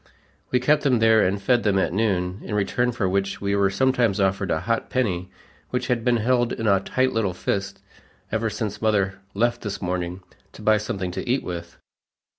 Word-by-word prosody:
We 125 - +2
kept 145 +4 +3
them 135 -4 +3
there 110 -1 +5
and 95 +2 +1
fed 120 +4 +2
them 100 -3 +2
at 85 -3 +1
noon, 95 -3 0
in 105 - -4
return 120 +5 +1
for 115 -5 -1
which 95 +1 -1
we 100 0 0
were 100 -1 +3
sometimes 115 -1 +2
offered 95 0 +1
a 80 - 0
hot 115 -1 -1
penny 90 -8 -1 0.4
which 125 0 -2
had 120 -2 +1
been 120 0 +3
held 120 +1 +1
in 110 - -4
a 100 -2 +4
tight 130 +6 0
little 100 -5 0
fist 100 +2 -3 0.5
"ever 110 +1 0
since 105 -1 -4
mother 100 -3 +1 0.2
left 120 +3 +1
this 105 -3 -4
morning, 90 0 -3 0.3
to - - -12
buy 110 0 +4
something 95 -4 -3
to 90 - -5
eat 130 +3 +1
with." 85 -1 -6
105 Hz, 200 wpm, -24 LUFS, 95-120 Hz, 0.5 s, there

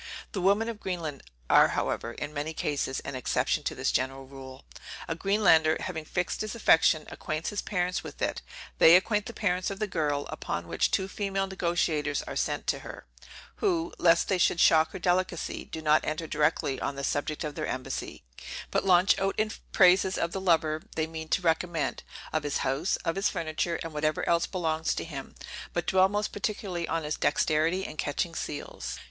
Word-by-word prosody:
The 195 - -3
women 200 +5 +3
of 230 -2 -5
Greenland 165 -8 -4 0.3
are - - +7
however, 115 - -2
in 145 +4 -6
many 155 +2 -3
cases, 140 -3 -2
an - - -6
exception 130 -1 0
to - - -1
this - - 0
general 135 +1 -1
rule. 130 0 -11 0.4
A - - -1
Greenlander, 165 -4 +3
having 160 -4 -5
fixed 175 +3 -2
his 215 +1 -4
affection, 160 -7 +4
acquaints 155 +1 -3
his 205 - -2
parents 180 -2 -1
with - - -9
it; - - -1 0.4
they 165 - +9
acquaint 210 +3 +2
the 235 - -7
parents 180 -3 0
of 195 - -5
the 215 - -1
girl; 150 -7 -1
upon - - -4
which - - +1
two 190 - 0
female 195 -1 -2
negociators 170 -5 0
are - - -6
sent - - -1
to - - 0
her, - - -10 0.5
who, 340 -5 0
lest 170 -1 +4
they 190 -2 +1
should 170 - +3
shock 160 -1 +5
her - - -4
delicacy, 180 -1 -1
do 160 - -7
not 155 0 +4
enter 155 +2 -2
directly 150 -3 0
on 140 - -2
the 140 - -5
subject 145 +3 -1
of 150 -1 -4
their - - -3
embassy, 130 0 -5 0.5
but - - +1
launch 185 0 +5
out 195 +1 0
in 215 0 +1 0.2
praises 185 0 +5
of 170 - -1
the 190 - -4
lover 160 -4 +2
they 160 - +1
mean 160 0 -7
to 180 - +1
recommend, 160 -5 0 0.3
of 155 - +1
his 145 -1 -1
house, 135 +8 +1
of 165 - 0
his 195 +1 +1
furniture, 165 +1 -2
and 165 -1 -7
whatever 155 +1 -1
else 170 0 +2
belongs 160 -3 -1
to - - -3
him, 140 -5 -8 0.4
but 175 -1 -1
dwell 190 +1 +4
most 205 +1 -1
particularly 200 -4 -3
on 165 0 -1
his 150 0 -2
dexterity 160 +5 +1
in 155 - -7
catching 160 +4 -1
seals. 150 -2 -5
165 Hz, 190 wpm, -28 LUFS, 155-190 Hz, 0.5 s, they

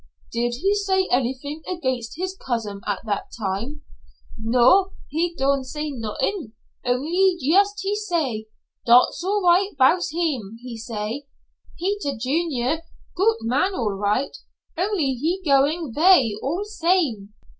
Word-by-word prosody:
"Did 240 +1 -1
he 395 +2 +3
say 385 -2 +1
anything 265 +5 -1
against 260 -8 -3
his 370 +2 -3
cousin 225 - -4
at 205 -2 -1
that 205 -2 -2
time?" 215 +8 -3 0.5
"No, 255 - +4 0.2
he 335 +3 -1
don' 275 0 +2
say 300 +3 -4
not'ing, 230 - -3 0.3
only 335 +10 +2
yust 400 +8 +3
he 400 +1 0
say, 320 - -2 0.4
'dot's 245 +7 +5
all 405 +2 0
right 370 +3 +4
bouts 325 +7 +4
heem,' 285 - -2
he 250 -2 -6
say, 225 +4 -5 0.5
'Peter 365 - -2
Junior 280 +2 0 0.3
goot 440 +5 +3
man 285 +11 +1
all 220 - 0
right, 205 +7 -1 0.4
only 355 -6 0
he 320 +9 -1
goin' 285 0 +2
vay 320 - +5
all 335 +9 -1
same.'" 325 - 0
285 Hz, 130 wpm, -23 LUFS, 240-365 Hz, 0.5 s, dot's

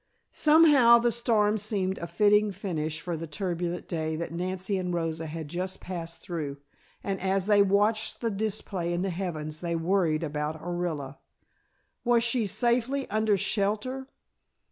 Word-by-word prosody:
Somehow 295 -7 +6
the 235 0 +2
storm 220 -3 +2
seemed 195 -2 -1
a 170 - -5
fitting 210 +3 +3
finish 160 -5 -3
for 175 -2 -4
the 165 +1 -6
turbulent 175 +2 -3
day 160 -2 -2
that 170 +1 -4
Nancy 185 +3 -2
and 180 -1 -2
Rosa 165 -2 -2
had 160 0 -6
just 180 +4 -4
passed 170 -2 -6
through, 150 -5 -4 0.5
and 195 -2 -3
as 190 0 +1
they 205 -1 +5
watched 205 +2 +1
the 230 -2 -1
display 195 -4 -2
in 175 +1 -1
the 195 - -1
heavens 160 -4 -4
they 170 -1 -1
worried 165 -2 +1
about 150 +1 -3
Orilla. 165 -5 -4 0.8
Was 240 -1 +3
she 230 -2 +1
safely 245 +6 0
under 215 -1 +2
shelter? 215 +7 -1
190 Hz, 150 wpm, -28 LUFS, 165-215 Hz, 0.8 s, Somehow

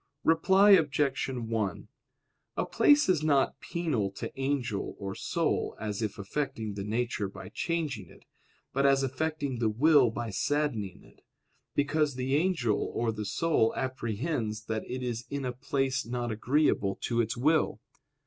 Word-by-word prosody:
Reply 190 +5 +5
Obj. 150 -6 +3
1: 115 -6 -2 0.7
A - - +1
place 290 0 +4
is 180 -5 +3
not 145 -3 +2
penal 150 - -1
to - - -5
angel 135 -6 -2
or 100 -1 -5
soul - - -1
as 105 0 -3
if 105 -2 -2
affecting 110 0 -3
the 100 -1 -5
nature 110 -1 -1
by - - -10
changing 150 - -3
it, - - -18 0.5
but 140 - +1
as 135 -1 +4
affecting 140 -1 -2
the 115 -2 +2
will 135 +3 +5
by 115 0 -4
saddening 120 -5 -1
it: - - -21 0.5
because 145 0 +1
the 130 +1 -2
angel 155 - +1
or 115 -1 +1
the 105 -1 -5
soul 115 +3 +1
apprehends 115 -2 -2
that 110 -1 -2
it 130 0 -4
is 120 -1 -3
in 140 -1 -3
a 125 - -1
place 135 +2 -1
not 120 0 -3
agreeable 110 -4 +1
to 120 -1 +1
its 115 0 -2
will. 155 +6 +2
130 Hz, 150 wpm, -29 LUFS, 110-150 Hz, 0.7 s, Reply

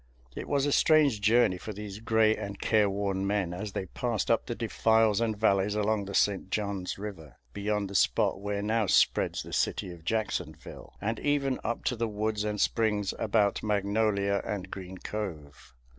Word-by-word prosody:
It - - -6
was 140 -1 +2
a 145 - +1
strange 145 -8 +4
journey 105 -3 +3
for 110 - -6
these 105 0 -7
gray 110 -1 +3
and 100 0 -6
careworn 100 -2 +1
men 100 -4 0
as 100 +3 -5
they 95 - -3
passed 115 +3 -2
up 115 - +1
the 120 - -3
defiles 110 -2 +2
and 110 -2 0
valleys 100 -1 +2
along 105 -1 0
the 100 0 -6
St. 95 -2 +1
John's 100 -3 -2
River, 85 -10 -8 0.2
beyond 105 0 -1
the 100 - -9
spot 95 - +2
where 100 0 -2
now 110 0 +1
spreads - - +2
the - - -10
city 90 - -1
of 85 -2 -14
Jacksonville, 110 +4 -4
and 115 +2 -2
even 140 -2 0
up 120 +1 -3
to 125 - 0
the 115 0 -1
woods 105 0 -2
and 105 -1 -2
springs 105 -3 +1
about 105 -2 +1
Magnolia 100 -1 +1
and 95 -2 -5
Green 95 -1 -7
Cove. 80 - -7
105 Hz, 175 wpm, -29 LUFS, 100-110 Hz, 0.2 s, strange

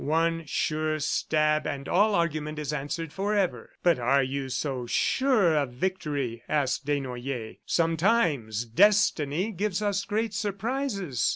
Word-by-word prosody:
One 165 +1 0
sure 155 +1 -1
stab 155 +1 +1
and 140 -1 -4
all 205 +3 +3
argument 155 -3 -1
is 150 -1 -3
answered 150 +2 -4
forever!" 200 -1 -1
"But 175 -6 +4
are 135 +3 +3
you 135 +1 -3
so 130 -1 -3
sure 220 - +2
of 140 -5 0
victory?" 140 -7 -2
asked 140 -2 0
Desnoyers. 130 -4 -3
"Sometimes 165 - +1
Destiny 185 - +3
gives 200 0 -1
us 200 -1 0
great 220 +1 -1
surprises. 205 - -1
155 Hz, 125 wpm, -27 LUFS, 140-195 Hz, -, But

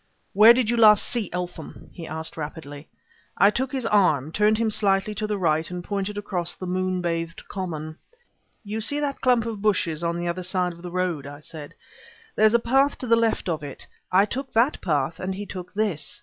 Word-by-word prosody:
"Where 215 +4 +8
did 245 -2 +1
you 240 +1 +1
last 210 -2 +6
see 230 -6 -1
Eltham?" 180 0 -7
he 170 -3 -8
asked 160 0 -5
rapidly. 150 -1 -7 0.5
I 200 - +6
took 260 +3 -2
his 260 -3 -3
arm, 170 - +2
turning 210 +4 +3
him 225 0 0
slightly 200 -1 +1
to 215 0 -3
the 210 -1 -1
right, 160 -3 +1
and 180 0 -6
pointed 200 +1 -3
across 180 -4 -2
the 185 - -7
moonbathed 180 -2 -2
common. 155 -5 -5 0.6
"You 215 +1 -4
see 285 +7 0
that 285 -2 -3
clump 245 -3 +3
of 220 -3 -5
bushes 185 -6 0
on 170 0 -1
the 175 0 -3
other 170 +2 -2
side 180 -1 -1
of 170 - -15
the 180 - -7
road?" 175 -5 -2
I 145 0 -9
said. 150 -1 -10 0.6
"There's 215 +1 +4
a - - +5
path 270 +5 +2
to - - -6
the 230 -1 +4
left 230 -3 0
of 160 -3 -1
it. 140 -2 -8 0.3
I 195 +2 +5
took 260 +4 -5
that 240 +6 +2
path 155 0 -1
and 190 0 -3
he 205 +2 -6
took 180 -2 -8
this. 195 -9 -2
185 Hz, 205 wpm, -24 LUFS, 170-215 Hz, 0.6 s, Where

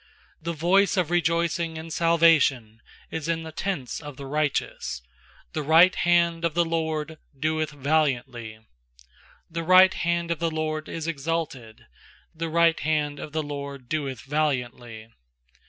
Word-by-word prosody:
15The 170 +1 -3
voice 195 +6 +3
of 175 -3 +1
rejoicing 170 -1 0
and 160 0 -7
salvation 155 -10 +3 0.3
is 160 -1 -4
in 165 -1 -1
the 160 - -8
tents 160 -6 -3
of 145 -3 -9
the 140 - -8
righteous; 145 - -2 0.5
The 155 - -2
right 165 +5 +6
hand 170 -1 +2
of 165 -2 0
the 170 0 +3
LORD 160 -1 -2 0.2
doeth 155 +1 0
valiantly. 135 -6 -1 0.9
16The 165 0 -4
right 185 +1 +7
hand 170 0 -1
of 170 - -1
the 170 - 0
LORD 155 -1 -3
is 165 -1 -5
exalted; 150 -7 -4 0.5
The 165 0 -4
right 165 0 +3
hand 150 -2 -1
of 150 - -7
the 155 0 -2
LORD 140 -3 -7
doeth 140 -6 -3
valiantly. 125 -6 -3
155 Hz, 140 wpm, -25 LUFS, 140-165 Hz, 0.9 s, right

